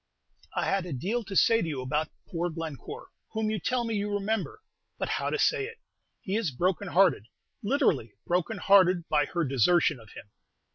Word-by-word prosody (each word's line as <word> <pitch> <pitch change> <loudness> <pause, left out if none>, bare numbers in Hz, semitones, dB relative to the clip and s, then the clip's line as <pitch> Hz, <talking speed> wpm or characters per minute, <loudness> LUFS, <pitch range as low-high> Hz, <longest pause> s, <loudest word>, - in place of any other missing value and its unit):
I - - 0
had 195 -2 0
a 170 - -4
deal 205 - -2
to 195 - -6
say 225 +4 +5
to - - -2
you 145 -4 -3
about 150 +4 0 0.2
poor 175 0 -2
Glencore, 165 - -7 0.2
whom 220 -1 0
you 215 - -1
tell 250 +7 0
me 230 -1 -2
you 205 0 -1
remember; 215 - -2 0.3
but, - - -3
how - - -1
to - - -1
say 445 -4 +2
it? 465 0 -11 0.4
He 195 - -3
is 220 -6 +1
broken 185 +8 -1
hearted 175 - +3 0.3
literally 165 - +1
broken 180 +5 0
hearted 185 -3 +4
by 150 -1 +3
her 170 +2 -1
desertion 140 +3 +3
of 110 -2 -15
him. 100 - -11
185 Hz, 190 wpm, -28 LUFS, 155-220 Hz, 0.4 s, say